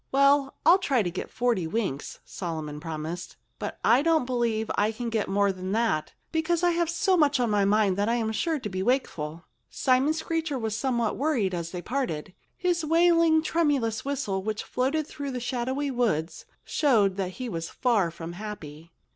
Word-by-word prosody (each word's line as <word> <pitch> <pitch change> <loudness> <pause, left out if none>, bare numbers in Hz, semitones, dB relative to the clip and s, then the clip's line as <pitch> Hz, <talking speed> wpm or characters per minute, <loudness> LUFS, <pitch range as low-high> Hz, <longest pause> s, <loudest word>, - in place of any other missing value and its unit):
"Well—I'll 275 +5 +4
try 270 - +1
to 175 - -2
get 185 - -5
forty 235 -8 0
winks," 170 -7 -3
Solomon 155 -4 -5
promised. 160 +2 -6 0.2
"But - - -4
I 240 +4 +5
don't 320 -3 +2
believe 235 -3 0
I 210 +2 +2
can 235 +1 -4
get 220 -3 -1
more 200 0 +2
than 185 +1 -5
that, 220 -9 0 0.2
because 325 +1 0
I 350 - +4
have 340 -1 0
so 380 +2 +2
much 290 -5 +3
on 240 -3 +1
my 205 -1 +3
mind 200 -2 +3
that 205 +2 +1
I'm 230 -2 0
sure 320 +8 0
to 250 - -5
be 185 -2 -3
wakeful." 170 - -1 0.2
Simon 265 +4 +2
Screecher 315 -2 -2
was 220 -3 -2
somewhat 235 -3 0
worried 250 -10 +1
as 170 -1 -3
they 175 0 -6
parted. 220 - -3 0.2
His 350 -2 0
wailing, 330 0 +4
tremulous 280 -10 +1
whistle, 265 -9 -2
which 215 +2 -3
floated 280 +5 -1
through 285 -1 -6
the 255 -2 -3
shadowy 260 +3 -2
woods, 210 -11 -1 0.2
showed 215 -10 +3
that 185 -2 -2
he 255 +4 -5
was 165 -6 -4
far 225 -9 +1
from 165 +1 -8
happy. 170 -6 -8
235 Hz, 180 wpm, -27 LUFS, 190-285 Hz, 0.2 s, I